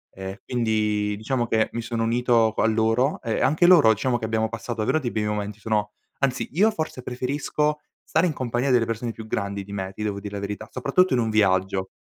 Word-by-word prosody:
ehm, 95 +1 -6
quindi 105 -3 0
diciamo 120 +3 -1
che 110 -1 +1
mi 115 - -2
sono 115 0 -3
unito 115 -1 +3
qua - - +1
a - - +4
loro 115 +5 +1
e 115 -3 -2
anche 155 +5 +3
loro 165 -11 +7
diciamo 120 +3 0
che 115 - -4
abbiamo 110 0 0
passato 115 +1 -5
davvero 110 +8 +2
dei 125 -6 -3
bei 105 -1 -1
momenti, 105 0 -3
sono 105 -1 -1 0.3
anzi 135 -2 0
io 200 +8 +4
forse 160 -9 -4
preferisco 145 +4 -1 0.2
stare 175 +3 +2
in 160 - -1
compagnia 125 0 -1
delle 120 -2 +4
persone 115 +1 -3
più 110 - -9
grandi 100 -2 -3
di 100 - -12
me 95 -1 -4
ti 105 - -6
devo 100 -2 -2
dire 100 0 -7
la 100 - -4
verità, 105 +2 -5
soprattutto 140 +8 +2
in 125 - +3
un 115 -2 0
viaggio. 95 -2 +2
115 Hz, 220 wpm, -24 LUFS, 105-125 Hz, 0.3 s, loro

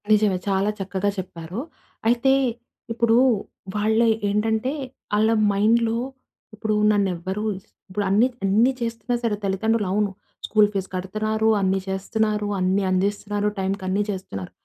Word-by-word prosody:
నిజమే 210 -3 +4
చాలా 195 +1 +2
చక్కగా 195 +1 -1
చెప్పారు. 180 +1 -6 0.5
అయితే 245 +3 +3 0.6
ఇప్పుడు 230 0 +3 0.6
వాళ్ళయి 220 +2 +3 0.2
ఏంటంటే, 220 +4 0 0.4
ఆళ్ళ 215 +2 +3 0.2
మైండ్‌లో 225 +3 +2 0.6
ఇప్పుడు 215 0 -1 0.2
నన్ను 200 -2 +2
ఎవ్వరు 190 +5 -4 0.5
ఇప్పుడు 205 +2 -2
అన్ని 210 +6 +4 0.2
అన్ని 220 +7 +4
చేస్తున్నా 235 +1 -2
సరే 225 -3 +1
తల్లిదండ్రులు 205 +2 0
అవును 205 0 +1 0.3
స్కూల్ 210 -1 +4
ఫీజ్ 195 -1 -2
కడుతున్నారు. 215 +4 -1
అన్ని 190 0 +2
చేస్తున్నారు. 210 +2 -1
అన్ని 185 +2 +1
అందిస్తున్నారు. 205 +2 0
టైమ్‌కన్నీ 190 0 -1
చేస్తున్నారు. 140 - -5
205 Hz, 120 wpm, -23 LUFS, 190-220 Hz, 0.6 s, నిజమే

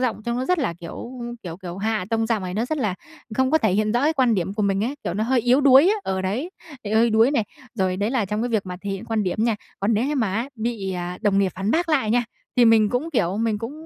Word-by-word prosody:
giọng 235 -4 -1
trông 235 0 -1
nó 255 - -1
rất 360 +5 +1
là, 260 - 0
kiểu 175 +8 -7 0.3
kiểu 170 -3 -6
kiểu, 180 -2 -8
hạ 215 -2 -1
tông 225 0 +1
giọng 220 -3 0
này, 180 -1 -4
nó 220 +4 0
rất 310 +3 -2
là 210 -7 0 0.4
không 260 0 +2
có 315 - +4
thể 220 -10 +1
hiện 215 +2 +1
rõ 240 - +2
cái 305 +2 +3
quan 255 -6 +2
điểm 190 0 -2
của 210 - -1
mình 200 0 +1
ấy, 260 +5 -2
kiểu, 175 - -2
nó 215 - 0
hơi 250 +1 +2
yếu 250 +4 +3
đuối 275 +4 +7
á, 415 - +3
ờ, 190 - -2
đấy, 230 - -2 0.3
bị 205 - -4
hơi 225 +1 +4
đuối 225 +4 +4
này. 240 -7 +1 0.3
Rồi, 185 -4 0
đấy 205 +4 -1
là 255 -5 +1
trong 210 +3 -2
cái 245 - -1
việc 220 -5 -1
mà 180 -1 -5
thể 200 - -4
hiện 195 -1 -4
quan 225 -1 -1
điểm 195 +3 -1
nha, 230 -2 +1 0.2
còn 205 +3 +2
nếu 220 +4 +1
như 295 - -1
mà 225 -9 0
á 230 +5 -1
bị, 220 -4 -3
à, 180 0 -4
đồng 205 -2 +3
nghiệp 195 -2 +1
phản 195 +3 -2
bác 335 +6 +1
lại 270 -9 +2
nha, 245 +1 +2 0.3
thì 245 - +6
mình 225 -2 +5
cũng, 255 +9 -2
kiểu, 190 - 0
mình 220 -1 0
cũng 230 +5 -5
220 Hz, 300 wpm, -23 LUFS, 195-245 Hz, 0.4 s, đuối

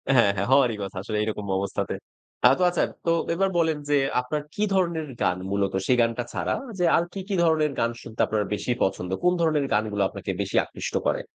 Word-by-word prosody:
হ্যাঁ, 110 -5 +5
হ্যাঁ, 100 +1 -1
হওয়ারই 130 -5 +4
কথা 95 0 -7
আসলে 105 +1 -3
এইরকম 105 -1 -3
অবস্থাতে। 100 +1 -2 0.5
আ - - +7
তো - - -4
আচ্ছা 175 -2 +1 0.2
তো 165 - +3 0.2
এবার 195 +3 +1
বলেন 160 -2 +2
যে 145 - +4 0.2
আপনার 150 +4 -3
কি 210 - 0
ধরনের 170 -5 0
গান 90 - +2
মূলত 100 -1 0
সেই 125 - +4
গানটা 115 +1 0
ছাড়া - - -1 0.3
যে 180 - +3
আর 170 - +2
কি, 195 - -5
কি 195 - 0
ধরনের 155 -3 +3
গান 115 0 +1
শুনতে 115 - -12
আপনার 110 -1 0
বেশি 115 - -2
পছন্দ? 90 -1 -1
কোন 180 0 +4
ধরনের 155 -3 +2
গানগুলা 105 -1 +1
আপনাকে - - -5
বেশি - - -4
আকৃষ্ট - - -6
করে? - - +1
125 Hz, 205 wpm, -25 LUFS, 105-165 Hz, 0.5 s, আ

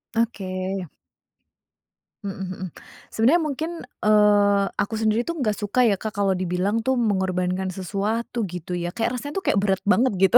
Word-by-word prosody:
Oke. 190 -5 -2 1.4
Mhm 195 - -3
mhm. 185 0 -5 0.5
Sebenarnya 265 +10 +4
mungkin, 310 +2 -2 0.3
eee, 205 -1 +5
aku 220 +2 -1
sendiri, 220 +1 +2
tuh, 335 +6 -4
enggak 220 -7 +1
suka, 225 +4 +2
ya, 215 - +4
Kak, 215 -1 -5
kalau 195 -1 +2
dibilang, 185 +4 0
tuh, 260 +2 +1
mengorbankan 190 -3 0
sesuatu, 205 +6 -2
gitu, 180 0 -6
ya. 175 0 -2
Kayak 235 +6 -1
rasanya, 290 +1 -6
tuh, 385 - -2
kayak 200 - +3
berat 195 -1 +1
banget, 210 +4 +3
gitu. 195 +5 +7
205 Hz, 155 wpm, -24 LUFS, 190-230 Hz, 1.4 s, gitu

